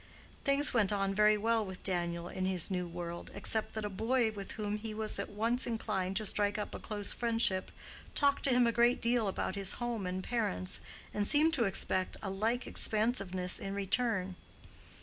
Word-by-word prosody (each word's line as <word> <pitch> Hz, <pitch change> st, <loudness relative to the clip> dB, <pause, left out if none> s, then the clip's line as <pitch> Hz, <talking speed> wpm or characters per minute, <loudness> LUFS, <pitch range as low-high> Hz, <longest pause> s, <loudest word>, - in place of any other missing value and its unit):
Things 280 Hz, +1 st, +4 dB
went 210 Hz, -5 st, +3 dB
on 195 Hz, -1 st, 0 dB
very 210 Hz, +1 st, +4 dB
well 225 Hz, +1 st, +1 dB
with 190 Hz, -2 st, -8 dB
Daniel 175 Hz, -2 st, -2 dB
in 185 Hz, +1 st, -3 dB
his 185 Hz, 0 st, -1 dB
new 180 Hz, -1 st, -1 dB
world, 170 Hz, 0 st, -6 dB
except 220 Hz, 0 st, +2 dB
that 220 Hz, -1 st, -3 dB
a -, -, -2 dB
boy 225 Hz, +3 st, +1 dB
with 200 Hz, -2 st, -7 dB
whom 210 Hz, -1 st, -3 dB
he 215 Hz, 0 st, -6 dB
was 215 Hz, 0 st, -1 dB
at -, -, -3 dB
once 230 Hz, +5 st, 0 dB
inclined 195 Hz, -5 st, -2 dB
to 215 Hz, +2 st, 0 dB
strike 205 Hz, +1 st, 0 dB
up 210 Hz, -, -4 dB
a -, -, -5 dB
close 205 Hz, -2 st, 0 dB
friendship 225 Hz, -5 st, +1 dB, 0.5 s
talked 280 Hz, -1 st, +3 dB
to -, -, +3 dB
him 250 Hz, -1 st, +4 dB
a 235 Hz, -, +3 dB
great 240 Hz, +1 st, +3 dB
deal 235 Hz, -2 st, +2 dB
about 190 Hz, -, -2 dB
his 195 Hz, -1 st, -1 dB
home 235 Hz, -5 st, -3 dB
and 185 Hz, +1 st, -3 dB
parents, 90 Hz, -, -2 dB, 0.3 s
and 205 Hz, -1 st, +1 dB
seemed 310 Hz, +2 st, +4 dB
to 245 Hz, -7 st, +2 dB
expect 190 Hz, -1 st, 0 dB
a 195 Hz, -, -3 dB
like 225 Hz, +6 st, -1 dB
expansiveness 195 Hz, -5 st, +1 dB
in 195 Hz, 0 st, -4 dB
return. 195 Hz, -2 st, 0 dB
210 Hz, 190 wpm, -33 LUFS, 190-230 Hz, 0.5 s, Things